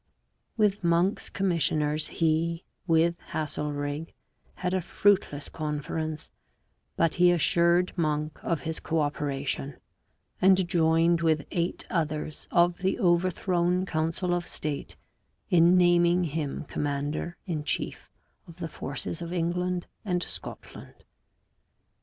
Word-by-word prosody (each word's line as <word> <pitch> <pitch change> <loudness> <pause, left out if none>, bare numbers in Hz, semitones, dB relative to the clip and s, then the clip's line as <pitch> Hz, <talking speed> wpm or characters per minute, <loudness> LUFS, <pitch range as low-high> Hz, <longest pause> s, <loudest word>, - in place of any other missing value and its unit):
With 205 -3 +2
Monk's 170 +3 +2
commissioners 155 -5 0
he, 165 +1 0 0.2
with 170 +1 +3
Haselrig, 150 0 -3 0.4
had 180 0 -2
a 185 - +1
fruitless 185 -5 +1
conference, 155 0 -4 0.6
but 165 -1 +2
he 180 - +7
assured 170 +1 +3
Monk 155 -2 -1
of 165 -5 -1
his 160 +3 -3
co 165 0 -1
operation, 140 -2 -2 0.6
and 190 -1 +5
joined 170 0 +3
with 155 -3 +2
eight 170 0 -2
others 155 -2 -2
of 175 0 +3
the 190 +4 0
overthrown 180 -1 +2
council 165 +2 -1
of 175 0 -2
state 150 -2 -4 0.6
in 175 +1 +6
naming 175 0 +4
him 155 -3 -3
commander 145 +4 -3
in 160 -6 -3
chief - - -3 0.4
of 170 - -12
the 165 -2 -5
forces 145 +4 -4
of 170 0 -5
England 180 +1 -1 0.2
and 180 -4 -1
Scotland. - - -10
170 Hz, 115 wpm, -27 LUFS, 155-175 Hz, 0.6 s, he